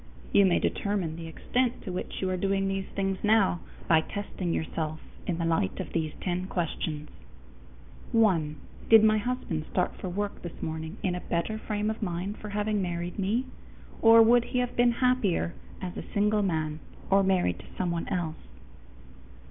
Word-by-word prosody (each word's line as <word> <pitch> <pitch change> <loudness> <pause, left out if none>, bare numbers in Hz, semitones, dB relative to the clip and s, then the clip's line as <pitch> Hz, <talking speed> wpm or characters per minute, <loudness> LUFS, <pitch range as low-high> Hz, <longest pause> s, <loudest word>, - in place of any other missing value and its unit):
You 200 -1 +6
may 180 - +3
determine 195 -6 -1
the 165 0 -7
extent 245 +9 -1
to 190 - -5
which 180 - -4
you 190 - +1
are - - +1
doing 195 +1 +1
these 195 0 -2
things 195 -1 0
now 210 -5 +4 0.3
by 160 -1 +5
testing 190 -1 -4
yourself 160 -1 -2 0.3
in 170 - 0
the 170 - -1
light 165 - 0
of - - -5
these 160 -2 0
ten 180 0 -2
questions: 155 -4 -3 1.0
_1. 175 -10 +3 0.3
Did 225 -1 +9
my 215 0 +5
husband 210 -10 -2
start 180 - 0
for 185 - -4
work 205 +3 -3
this 175 - -8
morning 160 +3 -4
in 185 - +1
a 180 - -3
better 175 +6 -2
frame 210 0 -1
of 220 - -7
mind 185 +1 -3
for 210 - -7
having 210 0 0
married 175 +1 -3
me, 215 +7 +1 0.6
or 225 0 +9
would 240 +1 +5
he 250 - -3
have 245 0 0
been 240 0 +4
happier 245 -9 +1 0.3
as 180 -1 -4
a - - -8
single 210 +1 +3
man 160 -5 -1 0.3
or 195 +1 +6
married 185 - +2
to 95 - -12
someone 170 -2 -1
else? 170 -4 -2
190 Hz, 175 wpm, -28 LUFS, 170-210 Hz, 1.0 s, Did